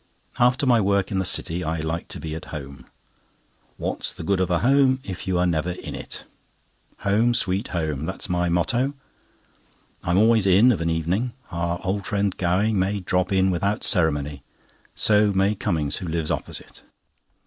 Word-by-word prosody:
After 125 +4 +3
my 120 -3 +4
work 100 0 +1
in 95 - 0
the 95 - 0
City, 90 -1 0
I 80 0 -2
like 80 +2 -3
to - - -4
be 80 -1 -5
at 80 - -6
home. 70 -4 -8 0.9
What's - - -2
the - - -7
good 95 +3 +1
of 95 - +1
a 90 - +2
home, 135 0 +4
if 95 -5 -7
you 95 -1 +1
are 90 - +2
never 85 0 0
in - - -8
it? - - -7 0.8
"Home, 110 +5 +2
Sweet 100 -1 0
Home," 80 -4 -2
that's - - -4
my 90 0 0
motto. 120 +11 +1 1.1
I - - -4
am 85 - +3
always 110 -1 +4
in 100 +7 +6
of 105 - -1
an 85 - 0
evening. 90 +9 -1 0.2
Our 85 0 -2
old 95 +1 -2
friend 100 -2 0
Gowing 95 +4 +1
may 100 +2 0
drop 90 +1 0
in 95 0 +3
without 100 +5 -1
ceremony; 75 - +2 0.5
so 105 -1 +3
may 95 +2 +2
Cummings, 80 -7 -1
who 90 - -5
lives 80 -1 -2
opposite. - - -6
95 Hz, 180 wpm, -23 LUFS, 85-105 Hz, 1.1 s, in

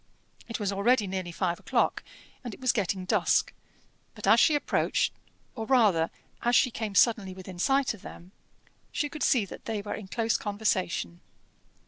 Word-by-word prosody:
It 230 - -4
was 205 -2 -1
already 210 +3 +2
nearly 185 -2 -4
five 175 0 -1
o'clock, - - 0 0.4
and 240 -4 -6
it - - -20
was 255 -1 +2
getting 195 -4 -2
dusk; - - +2 0.6
but - - -6
as - - +6
she 310 - +5
approached, 290 - 0 0.4
or 225 -2 -5
rather 205 -11 +4 0.3
as 240 +1 +2
she 250 - +4
came 220 -3 -4
suddenly 205 -6 +3
within 185 -1 -10
sight 270 +5 +2
of 215 - -13
them, 175 +2 -11 0.6
she 295 - -1
could 305 - -9
see 235 -6 +3
that - - -11
they 220 -2 -2
were 205 +1 -5
in 215 - -7
close 225 +2 0
conversation. 190 - -2
210 Hz, 170 wpm, -28 LUFS, 185-240 Hz, 0.6 s, as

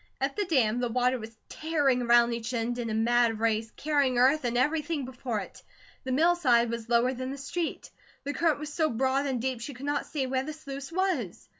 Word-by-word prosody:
At - - -1
the 415 - 0
dam, 245 -9 +2
the 245 -1 -1
water 250 +2 +1
was 220 0 -10
tearing 290 -5 0
around 240 0 +4
each 235 +2 -4
end 240 +1 -2
in 235 -1 -3
a - - -2
mad 230 0 +2
race, 225 0 0
carrying 285 -4 +1
earth 265 +3 +4
and 240 0 0
everything 300 +2 0
before 250 -4 -4
it. - - -11 0.4
The 260 - -2
mill 330 +7 +4
side 240 -8 +3
was 230 -1 -5
lower 240 +2 +3
than 255 0 -5
the 275 - -5
street. 315 +4 -4 0.3
The 285 +1 -3
current 325 -2 +2
was 295 0 -7
so 315 -1 +1
broad 265 +4 0
and 260 -3 -1
deep 255 0 -2
she 270 +3 -6
could 260 +3 -8
not 290 0 -1
see 285 -4 -2
where 260 0 0
the 305 +3 -5
sluice 280 -2 -8
was. 375 +2 -2
260 Hz, 225 wpm, -28 LUFS, 235-290 Hz, 0.4 s, around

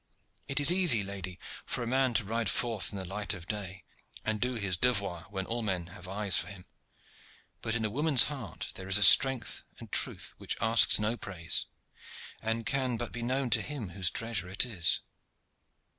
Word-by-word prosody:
It 140 - 0
is 145 +3 +8
easy, 175 - +4
lady, 95 -2 -6 0.3
for 120 - -4
a - - -5
man 130 -1 0
to 115 - +2
ride 115 0 -2
forth 115 -5 0
in 100 - -7
the 95 - -6
light 105 +3 -4
of 85 -2 -11
day, 95 -2 -6 0.4
and 110 -1 -2
do 125 0 -1
his 100 -5 -1
devoir 100 -6 -2
when 95 -2 -5
all 120 +3 -3
men 95 -6 -2
have 90 -1 -11
eyes 100 -2 +1
for - - -1
him. 95 -3 -11 1.0
But 115 - -2
in 110 -2 -2
a - - -1
woman's 145 +1 +4
heart 135 -8 -6
there 95 - -10
is 95 +1 +3
a 105 - +3
strength 130 +4 +6
and - - -13
truth - - -1
which - - -4
asks 115 +2 +5
no 105 +3 -2
praise, 85 -6 +2 0.7
and 115 +1 -3
can 130 -3 -2
but 120 -1 -6
be 120 - -7
known 130 +1 -2
to - - +3
him 140 -10 -7
whose 90 0 0
treasure 115 -5 -3
it 100 +6 +1
is." 95 -9 +2
110 Hz, 195 wpm, -29 LUFS, 95-120 Hz, 1.0 s, is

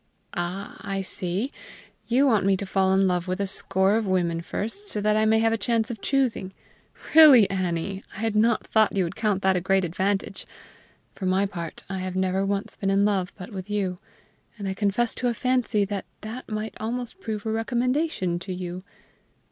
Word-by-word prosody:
"Ah, 180 +3 -4
I 195 -1 -3
see! 190 +8 -3 0.6
You 255 +4 +3
want 220 -7 +3
me 195 0 +3
to 200 - -4
fall 190 0 +1
in 190 0 +4
love 180 0 0
with 185 +1 -2
a 200 - +1
score 190 +1 +2
of 225 -2 -1
women 175 -3 +1
first, 310 - -3
so - - -1
that 210 +1 +2
I 215 0 +3
may 220 0 +4
have 225 0 +3
a 225 - -1
chance 225 +1 0
of 220 -4 -7
choosing. 250 -8 0 0.6
Really, 290 -9 +9
Annie, 185 +1 -2
I 195 - -6
had 225 -1 -1
not 225 +1 +3
thought 220 -2 +2
you 190 - +3
would 170 - -4
count 210 -3 0
that 190 0 +3
a 180 - 0
great 190 +1 +2
advantage. 195 +4 -2 0.7
For 190 - -4
my 190 +2 +2
part, 170 -5 -6
I 190 0 -4
have 185 0 -4
never 190 +1 +1
once 200 0 -2
been 195 - -2
in 195 +1 +3
love 195 -2 0
but 185 +3 -9
with 190 0 -7
you, 190 -3 -1 0.6
and 200 -2 -5
I 190 - -1
confess 210 +4 0
to 250 - -2
a 240 - 0
fancy 250 -4 +1
that 200 -1 -4 0.2
that 225 +4 -7
might 215 0 -3
almost 245 - -4
prove 215 - -4
a 220 - -1
recommendation 240 - 0
to 185 +2 -7
you. 180 0 -5
200 Hz, 205 wpm, -25 LUFS, 190-225 Hz, 0.7 s, Really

